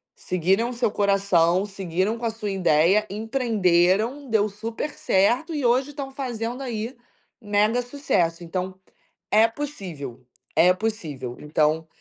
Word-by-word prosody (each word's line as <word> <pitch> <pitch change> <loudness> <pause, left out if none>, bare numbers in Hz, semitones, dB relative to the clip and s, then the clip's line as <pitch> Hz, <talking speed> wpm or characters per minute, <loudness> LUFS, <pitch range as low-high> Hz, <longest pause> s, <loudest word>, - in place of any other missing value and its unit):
seguiram 190 +6 0
o - - -5
seu 235 -2 0
coração, 195 -3 +2
seguiram 195 +1 -2
com 235 - -5
a - - +2
sua 220 -2 -4
ideia, 185 +2 +3
empreenderam, 220 +2 +1
deu 215 -2 +3
super 225 +8 -5
certo 245 - +1
e 290 -4 -1
hoje 255 +4 +3
estão 280 -2 -6
fazendo 245 -2 -4
aí 235 -1 -4 0.5
mega 210 +3 +2
sucesso. 185 - -1
Então, 185 +2 -4 0.6
é 220 +1 +6
possível, 180 - -7 0.3
é 180 +2 +6
possível. 160 - -4
Então, 155 +1 +1
210 Hz, 130 wpm, -24 LUFS, 180-235 Hz, 0.6 s, é